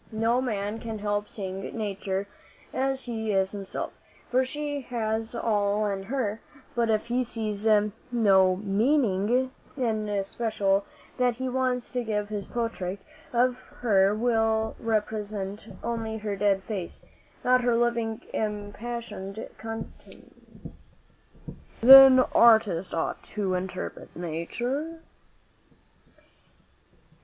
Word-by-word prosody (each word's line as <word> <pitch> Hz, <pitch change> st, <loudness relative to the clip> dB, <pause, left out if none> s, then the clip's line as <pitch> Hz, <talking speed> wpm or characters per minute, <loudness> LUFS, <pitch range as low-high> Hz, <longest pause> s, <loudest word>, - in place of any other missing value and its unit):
No 225 Hz, +3 st, +1 dB
man 210 Hz, -3 st, -2 dB
can 225 Hz, -1 st, -5 dB
help 205 Hz, 0 st, -2 dB
seeing 190 Hz, -2 st, -5 dB, 0.2 s
nature 200 Hz, -2 st, -2 dB, 0.5 s
as 270 Hz, 0 st, 0 dB
he 220 Hz, -3 st, -3 dB
is 190 Hz, -1 st, +1 dB
himself, 200 Hz, -2 st, -5 dB, 0.4 s
for 255 Hz, +1 st, +4 dB
she 290 Hz, +2 st, -4 dB
has 225 Hz, -2 st, -2 dB
all 210 Hz, -2 st, +1 dB
in 200 Hz, -2 st, -2 dB
her; 230 Hz, -3 st, -2 dB, 0.3 s
but 235 Hz, -1 st, +1 dB
if 215 Hz, -1 st, +1 dB
he 245 Hz, +2 st, 0 dB
sees 220 Hz, -3 st, -3 dB, 0.4 s
no 195 Hz, -6 st, +4 dB
meaning 220 Hz, +3 st, +1 dB, 0.3 s
in 220 Hz, -5 st, -1 dB
especial 200 Hz, -1 st, 0 dB, 0.3 s
that 250 Hz, -2 st, +2 dB
he 260 Hz, +2 st, -3 dB
wants 255 Hz, -1 st, -1 dB
to 250 Hz, -1 st, -1 dB
give, 210 Hz, -2 st, -2 dB
his 205 Hz, -2 st, -4 dB
portrait 225 Hz, -6 st, -3 dB, 0.3 s
of 250 Hz, +1 st, +2 dB, 0.2 s
her 200 Hz, -3 st, +4 dB
will 225 Hz, -1 st, +1 dB
represent 210 Hz, -2 st, -2 dB, 0.2 s
only 225 Hz, -1 st, -3 dB
her 210 Hz, -2 st, -3 dB
dead 195 Hz, -1 st, +1 dB
face, 195 Hz, -5 st, -6 dB, 0.4 s
not 255 Hz, 0 st, +4 dB
her 240 Hz, -1 st, +2 dB
living 235 Hz, -2 st, 0 dB
impassioned 210 Hz, -1 st, -4 dB
countenance." 225 Hz, 0 st, -10 dB, 1.0 s
"Then 265 Hz, +1 st, +11 dB
artists 220 Hz, -8 st, +4 dB
ought 165 Hz, -, -2 dB
to 200 Hz, -3 st, 0 dB
interpret 185 Hz, 0 st, -5 dB
nature?" 240 Hz, -, -3 dB
220 Hz, 110 wpm, -27 LUFS, 200-240 Hz, 1.0 s, Then